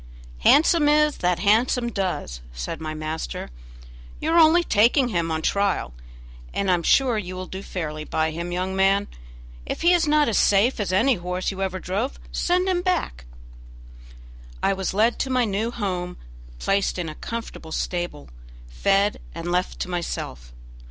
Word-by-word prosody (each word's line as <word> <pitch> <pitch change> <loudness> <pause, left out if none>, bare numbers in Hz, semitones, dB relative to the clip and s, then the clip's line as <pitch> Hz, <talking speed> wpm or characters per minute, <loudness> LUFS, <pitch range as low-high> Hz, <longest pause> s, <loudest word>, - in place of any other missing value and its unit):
"'Handsome 300 - +5
is 300 0 +3
that 180 -1 +1
handsome 235 +5 +2
does'," 180 - -3
said - - -5
my 155 -1 -4
master; 155 - -5 0.7
"you 315 - -1
are 335 - +5
only 330 +2 +6
taking 245 0 +3
him 170 -6 -1
on 160 0 -2
trial, 200 - 0 0.6
and 195 -2 +1
I - - +5
am 175 - +1
sure 245 +5 +3
you 185 -2 -6
will 185 0 -5
do 190 +1 -7
fairly 155 -6 -5
by 160 +1 -1
him, 170 +2 -5
young 185 +2 -2
man. 195 +1 +3 0.6
If - - -5
he 350 +1 +6
is 340 -3 +2
not 300 0 +4
as 225 - +2
safe 205 +6 +3
as 205 -3 -1
any 235 +7 +3
horse 180 +2 -3
you 195 0 -6
ever 190 -1 -2
drove 200 +10 -3
send 360 +1 +1
him 365 -2 +1
back." 65 - -1 1.4
I 195 - +3
was 190 0 -3
led 225 +3 +2
to 270 - -1
my 255 -2 +2
new 210 +2 -1
home, 185 -6 -3 0.4
placed 195 - 0
in 175 -2 -3
a 155 - -5
comfortable 230 -6 -7
stable, 175 -4 -3 0.4
fed, 200 - +1 0.2
and 170 +1 -4
left 180 +1 -1
to - - -2
myself. 115 - -5
195 Hz, 170 wpm, -24 LUFS, 175-240 Hz, 1.4 s, only